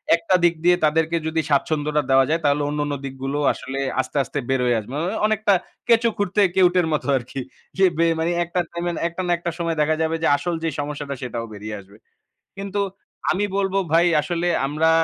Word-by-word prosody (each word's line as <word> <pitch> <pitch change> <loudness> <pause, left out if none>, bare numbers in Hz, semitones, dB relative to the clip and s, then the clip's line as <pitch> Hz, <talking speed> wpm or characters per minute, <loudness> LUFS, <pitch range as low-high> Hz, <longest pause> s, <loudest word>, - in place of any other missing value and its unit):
একটা 170 +2 +1
দিক 170 -1 +4
দিয়ে 175 0 +5
তাদেরকে 160 +2 +2
যদি 160 0 0
স্বাচ্ছন্দ্যটা 150 +1 +1
দেওয়া 135 0 +6
যায় 165 +1 +1
তাহলে 145 +1 +3
অন্যান্য 145 -1 -2
দিকগুলো 135 +2 -4
আসলে 135 +1 -6 0.2
আস্তে, 145 - -6
আস্তে 145 - -4
বের 135 -1 +2
হয়ে 120 -2 +2
আসবে। 110 +4 -10
মানে 180 +7 -2
অনেকটা 215 -2 +2 0.3
কেঁচো 230 0 +4
খুঁড়তে 205 +1 +1
কেউটের 180 -2 +4
মতো 150 - -1
আরকি। 130 +2 -6 0.4
এ - - +9
বে 170 - +3
মানে 165 +2 +1
একটা 175 +2 -2
টাইমে, 175 0 -2 0.2
একটা 170 +2 -5
না - - +1
একটা 170 0 -3
সময় 170 -1 -1
দেখা 155 +1 +2
যাবে 160 0 +1
যে, - - +4
আসল 175 +1 -2
যে, 165 - +1
সমস্যাটা 145 -1 -4
সেটাও 120 -2 -4
বেরিয়ে 105 +1 -6
আসবে। 100 +1 -16 0.6
কিন্তু 200 +1 -2 0.5
আমি 205 +3 +1
বলবো 195 0 0 0.2
ভাই 170 +1 +5 0.2
আসলে 175 +1 -2 0.2
আমরা 155 +3 +1
160 Hz, 190 wpm, -22 LUFS, 145-175 Hz, 0.6 s, এ